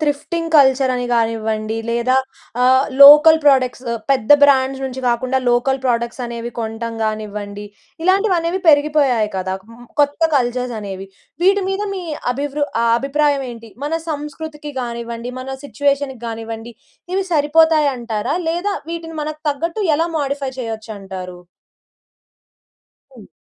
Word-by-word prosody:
Thrifting 320 +3 -2
culture 265 -1 +4
అని 245 0 -2
కానివ్వండి 220 -1 -1
లేదా 235 +2 +1 0.5
ఆహ్, 260 +2 +5 0.2
లోకల్ 300 +3 +9
ప్రొడక్ట్స్ 260 -2 +3 0.3
పెద్ద 260 -4 +1
బ్రాండ్స్ 270 -1 +4
నుంచి 260 0 -5
కాకుండా 255 +2 0
లోకల్ 245 +3 +1
ప్రొడక్ట్స్ 235 0 -1
అనేవి 235 0 -6
కొంటం 225 +1 -4
కానివ్వండి, 210 -1 -5 0.4
ఇలాంటివి 380 +1 +3
అనేవి 335 +3 -2
పెరిగిపోయాయి 290 -7 +3
కదా! 185 0 -2 0.2
మ్ 240 +1 -14 0.2
కొత్త 290 +3 +1
కల్చర్స్ 250 -1 -1
అనేవి. 195 -1 -7 0.4
వీటి 395 +1 +4
మీద 385 +1 -2
మీ 370 - -5 0.3
అభివృ 290 +2 -2 0.2
ఆహ్, 230 - +3
అభిప్రాయం 280 0 0
ఏంటి? 230 -2 -11
మన 295 - -3 0.2
సంస్కృతికి 300 0 -6
కానివ్వండి, 235 0 -5
మన 260 - -8 0.2
సిట్యుయేషన్‌కి 280 -3 -1
కానివ్వండి 225 +1 -6 0.4
ఇవి 385 0 0
సరిపోతాయి 305 0 +4
అంటారా? 235 +3 -3
లేదా 360 +5 -1 0.2
వీటిని 330 -1 -6
మనకు 305 0 -6
తగ్గట్టు 330 +7 -3 0.2
ఎలా 330 +2 0
మోడిఫై 280 -1 -2
చేయొచ్చు 225 -2 -5
అంటారు? 185 -2 -8 1.8
హ్మ్. 215 - -14
265 Hz, 130 wpm, -18 LUFS, 230-295 Hz, 1.8 s, లోకల్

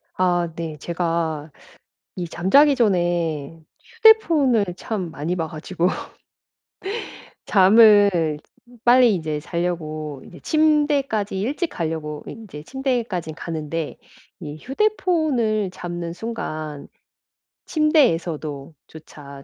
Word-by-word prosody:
아 175 -2 +1
네. 160 -2 -5
제가 165 -2 -2 0.7
이 175 -2 -4
잠자기 275 - +4
전에 175 - 0 0.2
휴대폰을 335 - +4
참 190 -4 -4
많이 160 +4 -3
봐 165 -2 -2
가지고 165 +3 -2 1.6
잠을 200 -6 +5 0.5
빨리 245 -2 +6
이제 155 -4 -3
자려고 155 -4 -4
이제 175 - -13
침대까지 290 -10 +1
일찍 285 - -1
가려고 155 - -4
인제 200 -10 -9
침대까진 235 - -2
가는데 160 -1 -5 0.4
이 150 -3 -7
휴대폰을 270 - 0
잡는 175 -2 -5
순간 155 -9 -6 0.8
침대에서도 165 - +1
조차 140 -3 -12
175 Hz, 205 characters per minute, -22 LUFS, 160-235 Hz, 1.6 s, 빨리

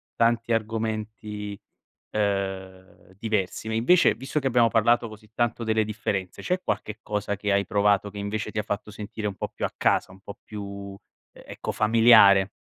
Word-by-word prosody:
tanti 115 0 +1
argomenti, 110 -2 -3 0.5
ehm, 95 -2 -3
diversi 110 -1 -2
ma 110 - -2
invece 125 +11 +4
visto 135 +4 -3
che 135 -2 0
abbiamo 120 -2 +4
parlato 115 +1 +3
così 110 0 -14
tanto 120 0 0
delle 110 0 +2
differenze, 105 -3 -3
c'è 180 0 0
qualche 110 0 -3
cosa 105 -1 -2
che 100 +1 -1
hai 100 0 +2
provato 100 0 +2
che 100 - -9
invece 105 +2 -3
ti - - -5
ha - - +1
fatto 105 0 -4
sentire 105 +1 -6
un 100 - -5
po' - - -3
più - - -6
a - - -2
casa, - - +1
un 95 - -16
po' 100 +1 -10
più, 100 -1 -7 0.4
e - - -15
ecco, - - -5
familiare? 110 -3 +6
105 Hz, 175 wpm, -25 LUFS, 100-115 Hz, 0.5 s, familiare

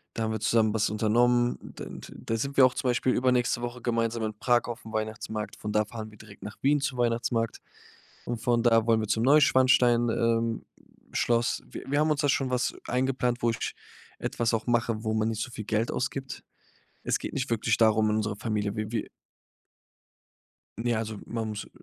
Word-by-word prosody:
da 115 - -1
haben 110 - -1
wir 110 - -2
zusammen 110 0 +2
was 110 -1 +1
unternommen. 120 +3 +2 0.2
Dann - - -8
dann - - -12
da 115 - -1
sind 140 +4 -3
wir 130 - +9
auch 130 - +1
zum 125 - -1
Beispiel 125 +1 +1
übernächste 125 -1 +2
Woche 120 0 -5
gemeinsam 115 -1 0
in 110 -1 -2
Prag 120 0 +3
aufm 115 -1 -7
Weihnachtsmarkt. 110 0 -4
Von 105 - -4
da 105 0 +3
fahren 110 0 -7
direkt 105 -1 -14
nach 105 - -7
Wien 145 +2 +3
zum 135 -2 -2
Weihnachtsmarkt 115 -1 0 0.7
und 120 -1 -3
von 120 -1 +2
da 115 -2 +4
wollen 115 -1 +4
wir 110 - -3
zum 110 +1 +1
Neuschwanstein 130 -4 +5
ähm, 115 0 0 0.5
Schloss. 120 0 +1
Wi - - -8
wir 145 +1 +2
haben 155 0 +3
uns 150 - +1
da 145 - +2
schon 135 0 +1
was 125 -1 0
eingeplant, 125 -1 0
wo 120 - +4
ich 115 - -4 0.4
etwas 115 0 -1
auch 115 +2 -1
mache, 115 -2 0
wo 110 -1 -1
man 110 0 +1
nicht 110 -1 -3
so 125 - -8
viel 110 -3 -7
Geld 110 +2 0
ausgibt. 135 0 -4 0.6
Es - - +1
geht - - -6
nicht 135 -2 -2
wirklich 115 -1 +1
darum 110 -1 +4
in 105 - +1
unserer 105 -1 -1
Familie. 105 -1 -2
Wi 110 0 -3
wi 115 - -2 1.7
Ne, 120 +1 0
also 110 -1 -3
man 115 -2 -3
muss, 105 -1 -5
äh - - -18
115 Hz, 200 wpm, -28 LUFS, 110-125 Hz, 1.7 s, wir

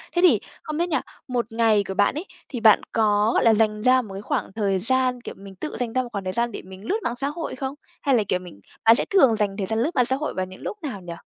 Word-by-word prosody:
Thế 350 - +3
thì 365 - +6 0.2
không 305 0 -4
biết 345 +1 0
nha, 320 - +1 0.3
một 240 -3 -2
ngày 225 -3 +3
của 190 - -3
bạn 205 +7 +2
ấy, 320 - -4 0.2
thì 245 - -4
bạn 220 -2 +6
có 210 0 +3
là 225 -1 +6
dành 215 -1 +1
ra 255 +1 +5
một 205 -5 -10
cái 195 - -6
khoảng 210 - -2
thời 200 -3 +1
gian, 255 +2 +1
kiểu, - - -8
mình 195 -1 -12
tự 305 - -6
dành 240 -2 -2
ra 255 0 +1
một 240 - -8
khoảng 200 -2 -4
thời 185 0 -3
gian 235 +2 0
để - - -6
mình 190 +2 -12
lướt 405 - 0
mạng 240 - -1
xã 275 +3 -2
hội 315 0 -4
không? 265 +1 -4 0.3
Hay 275 -3 +3
là, 220 - +3
kiểu, 180 - +1
mình 175 - -12 0.3
bạn 225 +1 +8
sẽ - - -1
thường 270 - +5
dành 205 -2 -1
thời 195 -2 -2
gian 220 0 -1
lướt 310 +9 0
mạng 250 -2 +4
xã 260 - +1
hội 305 +2 -3
vào 185 0 -2
những 185 0 -13
lúc 425 - -5
nào 210 -10 -5
nhỉ? 175 -1 -7
230 Hz, 300 wpm, -24 LUFS, 200-260 Hz, 0.3 s, bạn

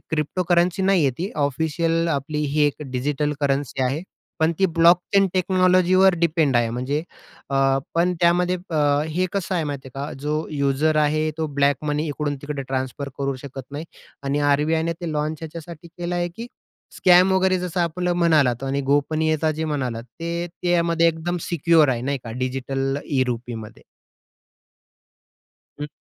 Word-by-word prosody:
Cryptocurrency 175 +4 +1
नाही 190 -3 +3
आहे 135 - +3
ती, 190 +4 -3
ऑफिशियल 160 +4 0
आपली 145 0 -2
ही 150 - +1
एक 145 +1 -3
डिजिटल 145 +3 -1
करन्सी 135 -1 0
आहे. 140 +6 -1 0.4
पण 160 +1 +2
ती 190 - +4
ब्लॉकचेन 175 +4 +4
टेक्नॉलॉजीवर 185 0 +4
डिपेंड 155 -6 +2
आहे, 115 -1 +2
म्हणजे 130 +6 -2 0.5
अ, 140 - -1 0.4
पण 175 +2 +2
त्यामध्ये 175 +1 +3
प 165 - -5 0.4
हे 185 +2 +1
कसं 195 -1 -2
आहे 165 - 0
माहिती 140 -3 -5
आहे 140 +1 -4
का? - - -7
जो 150 +1 -1
यूजर 145 +1 +1
आहे, 155 +1 +2
तो 160 - 0
ब्लॅक 140 0 +1
मनी 150 +1 -1
इकडून 145 0 -2
तिकडे 145 -1 -4
ट्रान्सफर 130 +1 -3
करू 140 -1 -1
शकत 135 -1 -7
नाही 145 +3 -5 0.4
आणि 140 +1 -1
आर-बी-आय 160 +3 +1
ने 165 0 -1
ते 170 -3 -3
लॉन्च 150 +1 -2
ह्याच्यासाठी 165 +1 -9
केलं 175 +1 -5
आहे 175 0 0
की 230 +1 -6 0.5
स्कॅम 185 +1 +5
वगैरे 190 0 +2
जसं 180 0 -2
आपलं 175 +1 0
म्हणालात 150 -8 +3
आणि 135 +1 -1
गोपनीयता 155 +2 +1
जे 160 +1 -3
म्हणालात, 130 -7 -2 0.2
ते 170 +1 -2 0.2
त्यामध्ये 170 -1 +2
एकदम 165 +2 -2
सिक्योर 165 -2 +4
आहे 125 -3 0
नाही 140 +1 -1
का 115 - -6
डिजिटल 135 +2 -2
ई-रुपीमध्ये. 120 -5 -3 2.0
हं. 150 - -2
155 Hz, 155 wpm, -22 LUFS, 140-170 Hz, 2.0 s, स्कॅम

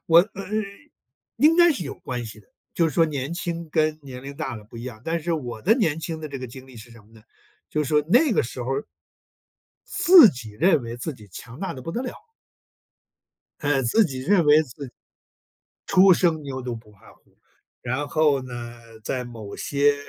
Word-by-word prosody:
我， 165 +1 +8
嗯， 200 +3 -3 0.7
应 310 +3 +5
该 345 0 +7
是 200 - -2
有 135 - -5
关 125 -2 -5
系 110 0 -10
的， - - -25 0.3
就 165 -1 +2
是 150 - -8
说 165 - +5
年 145 +1 -3
轻 170 -2 -4
跟 155 -1 +1
年 130 -2 -9
龄 140 +1 -8
大 130 -4 -4
了 105 - -11
不 115 +2 -12
一 - - -7
样， 120 -3 -8
但 165 +1 -1
是 170 +1 -1
我 120 -7 -5
的 220 +4 +4
年 160 - 0
轻 160 0 -5
的 155 - -6
这 140 -2 -6
个 130 - -6
经 130 +2 -12
历 130 - -15
是 115 +1 -12
什 115 -2 -15
么 110 +2 -24
呢？ 110 - -17 0.5
就 150 - -1
是 - - -5
说 150 -1 +3
那 255 - +4
个 - - +2
时 120 +1 -6
候 135 - -2 1.1
自 345 - +8
己 120 -7 -6
认 155 - +2
为 115 +1 -7
自 150 +3 -4
己 105 -3 -15
强 125 +7 -10
大 195 - -3
得 130 - -9
不 165 - -6
得 240 +8 -3
了。 250 - -6 1.4
哎， 145 -3 +1
自 205 - +3
己 130 -6 -4
认 175 +5 +3
为 150 +2 +6
自 140 0 -9
己 - - -15 0.9
“初 190 0 +6
生 165 -3 +2
牛 135 -2 -5
犊 120 -2 -4
不 110 -1 -15
怕 100 -2 -19
虎”。 - - -30 0.4
然 130 +4 -2
后 150 -4 +2
呢， 120 -2 -8 0.2
在 130 -1 -2
某 110 -4 -9
些 145 0 +2
140 Hz, 225 characters per minute, -24 LUFS, 120-170 Hz, 1.4 s, 我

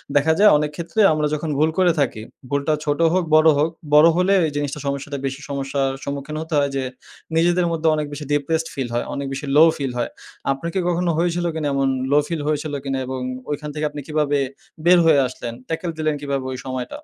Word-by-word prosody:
দেখা 150 +3 +4
যায় 210 - +8
অনেক 150 0 -1
ক্ষেত্রে 170 +6 -4
আমরা 150 -1 +1
যখন 155 +1 -2
ভুল 155 - +4
করে 185 -2 +4
থাকি, 120 -6 0 0.3
ভুলটা 140 +2 0
ছোট 145 0 0
হোক, 185 -1 +2
বড় 155 +1 +6
হোক, 150 +3 +2 0.2
বড় 150 +2 +8
হলে 185 +2 +3 0.2
জিনিসটা 145 0 -2
সমস্যাটা 140 +1 -3
বেশি 135 +1 -3
সমস্যার 135 -1 -1
সম্মুখীন 140 +2 -5
হতে 160 0 -6
হয় 140 - +1
যে, 135 - -1 0.5
নিজেদের 175 +1 +3
মধ্যে 165 -1 0
অনেক 150 - -1
বেশি 150 +1 -6
ডিপ্রেসড 160 +3 0
ফিল 135 -3 -3
হয়। 120 - -1
অনেক 140 - -3
বেশি 140 +2 -5
লো 155 - +9
ফিল 135 -3 -2
হয়। 120 - -1 0.4
আপনাকে 165 +7 -3
কি 180 - -2
কখনো 175 0 +1
হয়েছিল 175 0 0
কিনা 155 -2 -1
এমন 135 0 +1 0.2
লো 145 - +5
ফিল 165 -3 -3
হয়েছিল 150 0 -1
কিনা 135 -1 -2
এবং 130 0 -4 0.3
ঐখান 150 +1 -4
থেকে 150 0 -1
আপনি 145 0 -7
কিভাবে 150 -2 +1 0.5
বের 180 +1 +7
হয়ে 155 -3 +5
আসলেন, 120 -2 -7 0.2
ট্যাকল 165 +2 -2
দিলেন 155 -1 0
কিভাবে 140 -2 -2
ওই 130 - -4
সময়টা? 130 - -5
150 Hz, 210 wpm, -21 LUFS, 140-165 Hz, 0.5 s, লো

